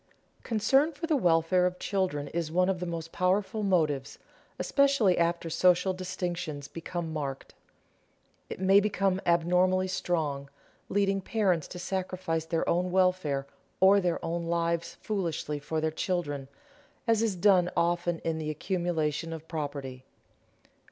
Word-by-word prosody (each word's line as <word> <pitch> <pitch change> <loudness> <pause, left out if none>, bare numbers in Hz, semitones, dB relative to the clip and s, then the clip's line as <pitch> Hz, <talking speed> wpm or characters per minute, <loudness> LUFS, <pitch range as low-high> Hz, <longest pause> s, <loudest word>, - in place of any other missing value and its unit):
Concern 270 +7 +2
for 295 +2 -5
the 320 -2 +1
welfare 180 - +3
of 180 0 -4
children 180 -9 -1
is 165 -2 -3
one 180 +2 +2
of 190 -2 0
the 180 - -4
most 165 -1 -5
powerful 190 +4 0
motives, 155 -9 0 0.4
especially 275 -10 +3
after 170 0 0
social 180 +3 +3
distinctions 180 -5 -4
become 165 0 -5
marked. 140 -3 -5 1.0
It - - -6
may 190 +1 +6
become 195 -2 0
abnormally 180 +2 +3
strong, 150 -7 -2 0.4
leading 195 0 +1
parents 190 -6 0
to 180 - -8
sacrifice 180 -3 -2
their 165 0 -1
own 180 +2 +1
welfare 180 -7 +1 0.3
or 195 +2 +6
their 175 -2 0
own 170 0 -2
lives 170 0 -1
foolishly 170 -7 -2
for 155 +2 -3
their 155 0 0
children, 150 -6 -2 0.6
as 225 -1 +3
is 220 -4 +1
done 180 -1 +4
often 175 0 +1
in 160 -1 -1
the 155 -1 -3
accumulation 165 -1 -1
of 160 0 -7
property. 140 -5 -5
175 Hz, 140 wpm, -29 LUFS, 160-190 Hz, 1.0 s, may